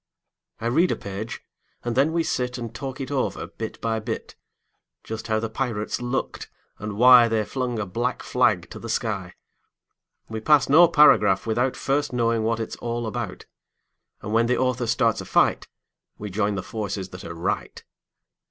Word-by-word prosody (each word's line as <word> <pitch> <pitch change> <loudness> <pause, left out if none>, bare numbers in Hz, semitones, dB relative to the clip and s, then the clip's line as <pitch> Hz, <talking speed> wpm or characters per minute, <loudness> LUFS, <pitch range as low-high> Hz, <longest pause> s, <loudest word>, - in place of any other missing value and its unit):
I 115 - -6
read 160 +10 +3
a - - +1
page, 100 +3 -6 0.4
and 120 -1 -2
then 140 +5 +3
we 165 0 +1
sit 125 -4 -2
And 115 -2 -6
talk 135 +2 -6
it 135 0 -5
over, 135 -2 -1
bit 110 -1 -7
by 115 -1 0
bit; 110 +1 -5 0.7
Just 110 0 -6
how 110 -1 +1
the 115 - -2
pirates 110 -2 -3
looked, 125 +2 -3 0.3
and 105 0 -5
why 125 0 +8
They 110 -2 0
flung 125 -1 -3
a 110 - -2
black 120 +7 -2
flag 105 -8 +2
to - - -8
the 115 - -8
sky. 100 -6 -2 0.9
We 110 0 -5
pass 145 +4 +4
no 160 +5 +7
paragraph 105 - +5
without 120 +3 0
First 140 0 -1
knowing 115 -2 +1
what 115 +1 0
it's 110 - -5
all 120 0 -3
about, 110 -3 -5 0.8
And 105 - -4
when 115 +1 +3
the 125 - +2
author 125 -2 0
starts 115 -1 +2
a - - -8
fight - - +2 0.5
We 105 -1 -6
join 100 +1 0
the 95 - -3
forces 100 -3 -4
that 90 0 -10
are 85 - -7
right. 85 - -3
115 Hz, 180 wpm, -24 LUFS, 110-125 Hz, 0.9 s, why